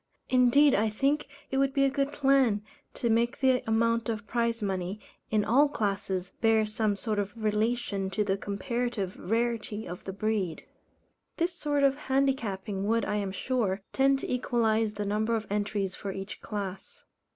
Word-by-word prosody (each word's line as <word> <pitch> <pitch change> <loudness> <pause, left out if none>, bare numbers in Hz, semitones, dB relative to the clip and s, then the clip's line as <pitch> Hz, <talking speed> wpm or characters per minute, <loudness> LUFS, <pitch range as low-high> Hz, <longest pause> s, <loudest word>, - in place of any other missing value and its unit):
Indeed 255 +3 +5
I 215 +2 +2
think 275 +7 0 0.2
it 265 - +1
would 275 0 +1
be 275 - +4
a - - +4
good 275 0 0
plan, 270 -7 +3 0.3
to 235 - -1
make 235 +3 +2
the 260 -2 +3
amount 230 +1 +2
of 215 -2 -3
prize 235 -1 -1
money, 190 0 -2 0.3
in 210 -1 +2
all 280 +6 +4
classes, 195 -6 -2
bear 225 -1 +4
some 215 -1 0
sort 210 0 -2
of 200 0 -2
relation 215 -2 0
to 195 +2 0
the 195 -1 +1
comparative 205 0 -3
rarity 225 0 -1
of 175 +1 -7
the 190 - -5
breed. 200 -4 -2 0.7
This 340 +1 +1
sort 290 -4 0
of 275 0 +4
handicapping 235 -9 -1
would, 230 +1 +2
I 210 - -1
am 200 -2 -2
sure, 200 -2 -1
tend 270 0 +4
to - - -3
equalize 225 -3 +1
the 205 - -3
number 215 +3 0
of 220 -1 -2
entries 205 -2 -1
for 200 - -5
each 195 +1 -7
class. 200 -3 -6
220 Hz, 170 wpm, -29 LUFS, 205-250 Hz, 0.7 s, Indeed